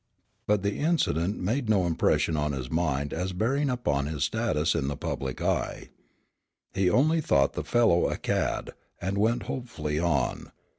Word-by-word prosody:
But 105 -2 +2
the 100 0 -1
incident 105 - +1
made 115 +6 -1
no 100 -4 +3
impression 80 -1 +1
on 75 -1 0
his 65 -2 -5
mind 75 -4 0
as 90 +3 -2
bearing 135 +9 0
upon 75 - 0
his 75 -2 -2
status 85 -3 +1
in 75 -5 -1
the 70 0 -3
public 65 -1 -4
eye. - - -1 0.8
He 95 -2 +2
only 155 - +3
thought 70 - +2
the - - -3
fellow 115 -8 +3
a - - -2
cad, - - -1 0.3
and 95 +2 -2
went 115 +3 +2
hopefully 75 - -3
on. 75 -7 0
90 Hz, 160 wpm, -27 LUFS, 75-115 Hz, 0.8 s, no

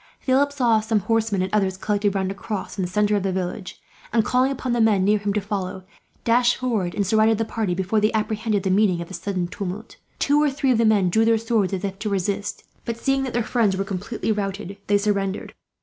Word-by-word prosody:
Philip 275 +2 +2
saw 240 -6 +3
some 215 -1 0
horsemen, 215 -2 0
and 185 - -4
others, 190 -3 +1
collected 205 0 0
round 190 -1 0
a - - -3
cross 200 0 -5
in 190 - -2
the 180 - -3
centre 210 +2 +2
of 205 - +1
the 190 0 -1
village 185 0 -4 0.3
and, 225 -1 +2
calling 255 +2 +2
upon 260 -2 -2
the 240 - +1
men 210 -4 +4
near 210 +1 +3
him 205 0 -1
to 210 - 0
follow, 190 -2 -4 0.4
dashed 240 +1 +3
forward 220 -9 -1
and 200 - 0
surrounded 220 +2 +3
the 225 - 0
party, 215 -5 -2
before 190 +4 0
they 215 - +3
apprehended 215 -1 -1
the 190 - 0
meaning 190 -3 +3
of 170 - -6
this 190 - -6
sudden 185 -3 -2
tumult. 200 +3 -6 0.2
Two 290 +1 +3
or 300 - +3
three 275 -1 0
of 235 - +2
the 230 - +4
men 200 -5 +3
drew 220 +5 +3
their 225 0 +4
swords, 220 -3 0
as 190 -1 -3
if 195 0 -4
to 215 - -2
resist; 200 +1 -2 0.2
but 230 -1 -4
seeing 270 +3 +1
that 265 -2 -3
their 240 0 +1
friends 215 -5 +1
were 195 - 0
completely 200 +4 -3
routed, 200 -1 -3
they 205 - +4
surrendered. 200 -1 -1
210 Hz, 240 wpm, -23 LUFS, 195-225 Hz, 0.4 s, men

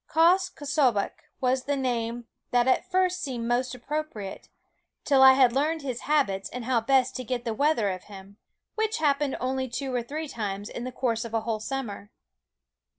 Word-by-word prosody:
Quoskh 365 +3 +4
K'sobeqh 275 -8 +1 0.3
was 260 0 +1
the 285 - 0
name 240 -2 -2 0.2
that 245 0 +2
at 260 - +2
first 365 -1 +1
seemed 245 -6 -3
most 250 +1 0
appropriate, 250 -7 -5 0.5
till 275 -2 +4
I 265 0 +10
had 260 -3 +5
learned 305 +3 0
his 255 -3 -3
habits 195 -11 +1
and 250 -1 -6
how 245 -2 +2
best 260 +2 +2
to 255 - -4
get 245 0 -3
the 230 - -1
weather 235 -5 +2
of 185 -1 -7
him 200 0 -12 0.4
which 440 0 -1
happened 290 -2 +1
only 260 0 -1
two 265 +2 -4
or 245 - +1
three 305 +6 -5
times 205 -5 -4
in 240 - -6
the 255 - -4
course 235 -3 -1
of 230 -1 -5
a 225 - +1
whole 220 -1 -2
summer. 215 -4 -5
255 Hz, 185 wpm, -27 LUFS, 230-285 Hz, 0.5 s, I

